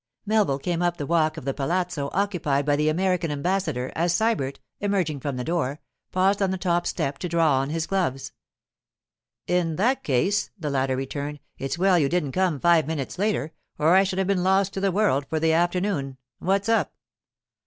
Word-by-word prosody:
Melville 210 -10 +2
came 170 +4 -2
up 175 0 +1
the 145 - -3
walk 160 0 +1
of 145 - -7
the 135 - -1
palazzo 165 0 -1
occupied 175 -8 0
by 145 -1 +3
the 150 +1 +2
American 180 +1 0
ambassador 150 -4 -1
as 170 +1 +1
Sybert, 175 -8 0 0.2
emerging 185 -8 0
from 140 0 -3
the 125 - -3
door, 155 -2 -1 0.3
paused 195 +2 +2
on 195 - +2
the 190 - -1
top 175 -1 0
step 140 -4 -2
to 180 - -4
draw 165 -5 +3
on 135 +1 -2
his 160 +1 -1
gloves. 170 -9 -1 1.1
'In 175 -3 0
that 240 - +1
case,' 170 +10 +1
the 155 -6 -3
latter 135 -1 0
returned, 140 +2 -4 0.2
'it's 135 +5 -3
well 185 0 +4
you 140 -3 +2
didn't 160 -5 0
come 180 -3 0
five 170 -2 +4
minutes 155 +1 -4
later, 200 -7 0 0.3
or 160 +4 +4
I 190 - +7
should 190 -1 -3
have 190 - +1
been 195 -2 +1
lost 190 +1 +2
to - - -3
the 195 0 +1
world 175 -9 +1
for 160 - 0
the 160 0 +2
afternoon. 175 -5 0 0.2
What's 195 +2 0
up? 225 0 +1
170 Hz, 195 wpm, -25 LUFS, 145-190 Hz, 1.1 s, I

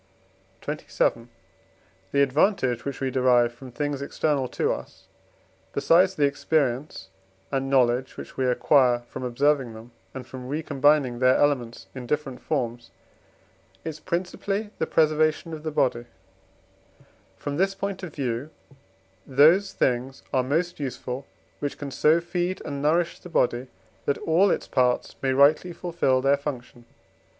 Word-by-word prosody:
XXVII. 115 0 -1 0.8
The 140 - +4
advantage 135 - +1
which 140 -1 -5
we 135 -1 -1
derive 125 -2 +3
from 130 +2 -11
things 145 +1 -3
external 140 -1 0
to - - 0
us, - - -9 0.7
besides 175 +7 +4
the 145 - +3
experience 140 -7 -1 0.4
and 135 -1 -1
knowledge 130 -1 +2
which - - -9
we 130 - 0
acquire 125 -1 +3
from - - -7
observing 130 0 +1
them, 115 +2 -12 0.2
and 130 - -6
from 125 -1 -9
recombining 145 -3 +2
their 130 0 +5
elements 125 -5 0
in 130 -2 -7
different 140 -2 -2
forms, 120 -5 -3 1.0
is 155 -1 -5
principally 190 +5 -3
the 160 - 0
preservation 155 +1 +2
of 155 - -6
the 155 - -3
body; 130 -5 0 1.3
from 145 0 -4
this 195 +2 +1
point 195 -1 -4
of 175 -5 -8
view, 130 0 -2 0.8
those 160 +9 +5
things 130 +1 -1
are 130 - +3
most 165 +7 -1
useful 130 -1 -5 0.3
which 145 -1 -3
can 145 -1 -6
so 155 +5 +4
feed 175 +2 -2
and 140 -1 -4
nourish 165 +3 +1
the 180 - -11
body, 125 -5 +1 0.4
that 140 - +1
all 175 +5 +3
its - - -1
parts 125 -1 +1
may 135 - +1
rightly 145 +6 +4
fulfil 165 -7 0
their 140 +1 +4
functions. 125 -4 -7
140 Hz, 140 wpm, -25 LUFS, 125-155 Hz, 1.3 s, their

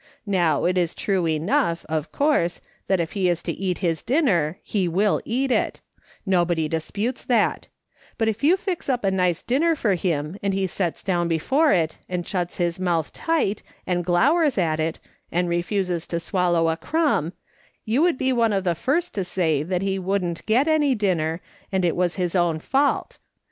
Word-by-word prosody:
Now 175 -7 +1
it 180 +1 +2
is 175 -2 -1
true 190 -4 0
enough, 165 +1 0
of 155 -1 -3
course, 280 - +1 0.3
that 190 -2 +2
if 165 -1 -2
he 190 -3 +1
is 175 -1 -1
to - - -2
eat 185 -2 -2
his 165 -2 0
dinner 190 - +1
he 195 -4 -1
will 195 +5 +1
eat 260 +3 0
it; - - 0 0.5
nobody 175 -4 +1
disputes 200 +10 -3
that; 235 -4 +1 0.5
but 225 - +1
if 220 +3 -2
you 340 +6 +5
fix 370 -5 -4
up 250 -3 0
a 195 - +2
nice 180 -3 +1
dinner 320 +7 +2
for 215 -9 +1
him 165 -1 -2
and 200 -1 0
he 195 0 0
sets 180 -2 -3
down 175 -3 0
before 270 - +2
it, 160 -3 +1
and 180 -2 -3
shuts 180 -3 -2
his 175 0 -1
mouth 170 -4 -1
tight, 310 -12 0 0.2
and 175 -1 0
glowers 275 - +3
at 160 -4 +1
it, 160 +1 -1 0.3
and 175 +1 0
refuses 175 0 -1
to 170 - -2
swallow 175 -2 +1
a 160 - -1
crumb, 295 - 0 0.5
you 230 +6 +1
would 340 -4 +3
be 260 0 +1
one 230 -3 +2
of 195 -1 0
the 175 -2 +1
first 285 - -1
to 195 - -1
say 170 -5 0
that 180 +4 -2
he 195 0 -1
wouldn't 180 -3 -2
get 245 +7 +3
any 300 -4 +3
dinner, 175 -6 0 0.3
and 190 -2 +1
it 170 - +1
was 175 -1 0
his 180 -1 -2
own 175 -3 +2
fault. 275 - 0
185 Hz, 190 wpm, -23 LUFS, 170-225 Hz, 0.5 s, you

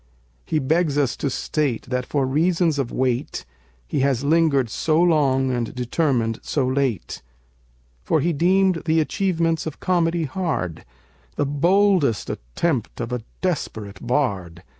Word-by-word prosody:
He 155 - 0
begs 155 +1 +1
us 140 -4 +1
to 140 - -1
state 135 -2 -1
that 125 0 -3
for 140 -2 0
reasons 165 +2 +1
of 130 -4 -2
weight 130 +1 -1 0.4
He - - -2
has 135 -2 +1
lingered 150 -4 +3
so 155 +8 0
long 140 -6 +3
and 120 -1 -2
determined 125 -3 0
so 140 -4 -1
late. 130 - -1 0.8
For 160 - +2
he 170 +4 +1
deemed 185 +3 +2
the 160 0 +3
achievements 165 -1 0
of 155 - -6
comedy 170 -2 +1
hard, 140 - -3 0.5
The 145 - 0
boldest 170 - +2
attempt 115 - -2
of 120 0 -4
a 125 - -2 0.2
desperate 110 - -3
bard! 100 - -1
145 Hz, 140 wpm, -22 LUFS, 125-165 Hz, 0.8 s, lingered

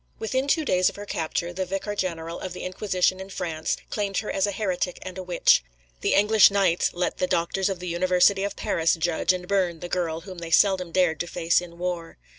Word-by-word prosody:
Within 260 +5 -1
two 315 +1 +2
days 185 -6 +3
of - - -12
her 205 - -8
capture, 170 -1 -3
the 185 - -2
Vicar 195 +3 -3
General 170 -3 -3
of 185 - -6
the - - -7
Inquisition 185 0 0
in 190 0 -8
France 165 -5 -3
claimed 200 -2 -2
her 210 - -2
as 195 +1 +1
a - - -1
heretic 185 -3 -2
and 185 - -7
a 190 - -5
witch. 180 - +3 0.4
The - - +1
English 210 +1 +6
knights 195 -4 +2
let 180 0 -2
the 185 - +1
doctors 185 +3 0
of 190 - -2
the 180 +1 -7
University 180 +3 +3
of 200 0 -3
Paris 165 -1 +1
judge 165 +2 +1
and 180 -1 -4
burn 180 -4 0
the 175 - -6
girl 165 -3 -2
whom 185 0 -9
they 170 -1 -6
seldom 185 0 +3
dared 175 -3 +2
to 175 - -2
face 170 0 +1
in 170 -1 -11
war. 175 -2 -4
180 Hz, 225 wpm, -25 LUFS, 170-195 Hz, 0.4 s, English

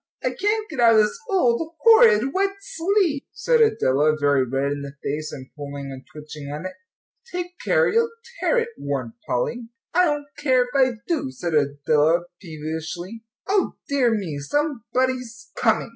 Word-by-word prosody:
"I - - +1
can't 425 +2 -1
get 305 -8 -7
out 230 -1 +6
of 215 - +7
this 210 - -1
old, 325 - +1
horrid, 270 - +6
wet 395 +1 +1
sleeve," 350 -5 0
said 480 -1 +2
Adela, 155 - +3
very 145 -2 +3
red 135 +3 -1
in 145 0 -3
the 140 0 -7
face, 150 +2 -3
and 130 -2 -9
pulling 140 -2 -7
and 130 -1 -9
twitching 150 -1 -9
at 150 +4 -6
it. 185 - -3 0.6
"Take 355 0 -5
care, - - +3
you'll 460 +1 +2 0.3
tear - - +2
it," 470 0 +1
warned 130 -5 -3
Polly. 230 - -2 0.2
"I 360 +1 +5
don't 295 -3 -1
care 260 -4 +3
if 245 - -9
I 260 -2 +3
do," 330 - -1
said 160 +6 -4
Adela, 150 +3 +2 0.2
peevishly. 160 +6 -6 0.2
"O 395 0 +1
dear 275 -4 +2
me, 170 -9 -4
somebody's 250 - -2
coming!" 225 -1 +1
230 Hz, 165 wpm, -23 LUFS, -, 0.6 s, of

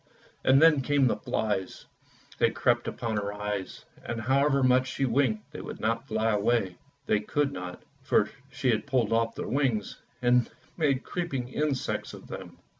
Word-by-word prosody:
And 130 +1 +6
then 155 -2 +6
came 140 0 +2
the 120 - +2
flies, 105 -3 -2 0.5
they - - +5
crept - - +1
upon 115 -3 -2
her 100 0 -2
eyes, 105 -2 -4 0.2
and 115 - -4
however 140 +3 +3
much 130 0 +4
she 135 +1 -1
winked 115 -4 0
they - - -7
would - - -7
not 115 +1 -1
fly 110 +1 +1
away; 105 -3 +1 0.3
they 105 - +2
could 145 +7 0
not, 90 -8 -7 0.2
for - - +3 0.2
she 130 - +1
had 115 +5 -1
pulled 125 -5 +1
off 115 0 +1
their - - -4
wings 130 -6 -1 0.2
and 125 -1 +3 0.3
made 140 -5 +1
creeping 140 -9 -3
insects 145 -1 -2
of - - -13
them. - - -8
120 Hz, 170 wpm, -28 LUFS, 110-135 Hz, 0.5 s, And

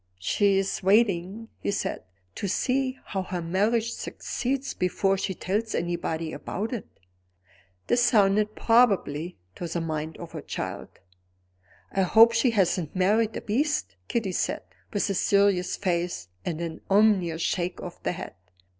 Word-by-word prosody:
"She's 195 - +1
waiting," 200 +1 +2
he - - -3
said, 200 - -2 0.3
"to 200 - -3
see 260 +6 0
how 195 - -2
her 185 -1 -4
marriage 210 +7 +1
succeeds, 270 +2 -3
before 195 +2 +1
she 190 0 -2
tells 215 +6 -2
anybody 165 -2 -2
about 220 +5 -4
it." 235 - -5 1.0
This 240 - +2
sounded 210 -3 +3
probable 195 -9 +3 0.2
to 175 - -4
the 170 +1 -2
mind 155 -1 -3
of - - -9
a - - -5
child. - - -5 1.0
"I 195 - +1
hope 225 +5 +7
she 230 +2 +3
hasn't 185 -7 +1
married 210 +4 +2
a - - -5
beast," 215 - 0
Kitty 220 -5 -1
said, - - -1 0.3
with 205 - 0
a 200 - 0
serious 200 -2 +2
face 175 - -2
and 165 -2 -3
an 165 -1 -5
ominous 195 -5 +3
shake 180 0 -1
of 180 - -8
the - - -1
head. 180 - -7
195 Hz, 145 wpm, -26 LUFS, 175-220 Hz, 1.0 s, hope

